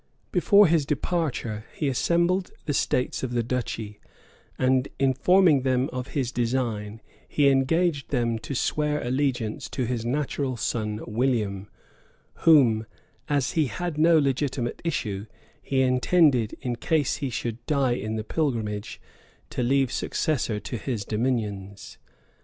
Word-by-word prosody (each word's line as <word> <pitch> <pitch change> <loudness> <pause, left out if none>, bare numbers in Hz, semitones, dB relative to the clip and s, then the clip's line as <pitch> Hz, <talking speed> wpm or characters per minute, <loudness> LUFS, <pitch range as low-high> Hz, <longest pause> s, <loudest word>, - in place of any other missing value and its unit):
Before 205 0 +5
his 165 -3 +3
departure, 140 -7 -2
he 150 - -1
assembled 170 +7 +1 0.2
the 145 - -1
states 125 -2 0
of 125 -2 -3
the 120 -1 +1
duchy; 115 -3 -4 0.6
and 130 +1 +2
in 135 -1 +2
forming 180 0 +4
them 130 0 +1
of 125 0 -4
his 125 -3 0
design, 115 -4 -2 0.3
he 145 -2 +3
engaged 140 +3 +1
them 120 -4 0
to 140 - -6
swear 150 +3 0
allegiance 125 -3 -1
to 130 - -2
his 120 -1 -2
natural 135 0 -2
son, 110 -1 -2
William, 105 -4 -1 0.8
whom, 120 -9 +5 0.4
as 140 -2 +1
he 155 -3 +1
had 175 0 -4
no 165 +1 +6
legitimate 135 -3 -1
issue, 110 - -2 0.3
he 135 -1 0
intended, 130 -2 +3
in 125 -3 -3
case 150 +1 0
he 140 -3 -3
should 115 0 -4
die 140 -4 +2
in 110 -2 -3
the 110 - -3
pilgrimage, 110 -8 -2 0.5
to - - -2
leave 135 +1 +2
successor 125 -9 -1
to 120 - -5
his 110 -2 -3
dominions. 105 -4 -3
130 Hz, 135 wpm, -25 LUFS, 115-145 Hz, 0.8 s, no